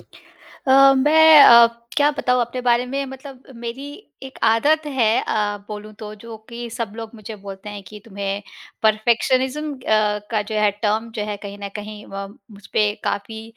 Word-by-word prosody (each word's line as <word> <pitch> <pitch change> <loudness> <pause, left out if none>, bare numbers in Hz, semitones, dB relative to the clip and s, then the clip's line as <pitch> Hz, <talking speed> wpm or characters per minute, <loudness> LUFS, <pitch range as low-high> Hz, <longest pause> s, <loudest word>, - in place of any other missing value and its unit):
अ, 270 0 +1
मैं 310 +3 +7
अ, 235 -2 +9 0.3
क्या 290 0 +4
बताऊँ 250 -4 0
अपने 240 +2 -3
बारे 245 0 +1
में 275 +2 -3
मतलब 265 0 -11
मेरी 235 +4 -7 0.4
एक 265 0 -10
आदत 290 +8 +2
है 260 -7 +1
अ, 205 -1 -1
बोलूँ 210 0 -8
तो 215 -1 -8
जो 230 -1 -9
कि 235 0 -7
सब 225 -2 -5
लोग 225 -1 -7
मुझे 215 0 -9
बोलते 195 0 -9
हैं 205 -1 -8
कि 210 0 -11
तुम्हें 200 -1 -5 0.4
परफेक्शनिज़्म 255 +7 +1
अ, 265 - -14 0.5
का 215 -2 0
जो 215 +1 -7
है 210 -1 +3
टर्म 220 +2 0
जो 210 - -2
है 210 -1 -4
कहीं 200 0 -8
न 200 - -4
कहीं 210 0 -9
व 195 0 -5 0.2
मुझपे 205 +1 -1
काफ़ी 220 +2 -4
230 Hz, 170 wpm, -21 LUFS, 210-260 Hz, 0.5 s, अ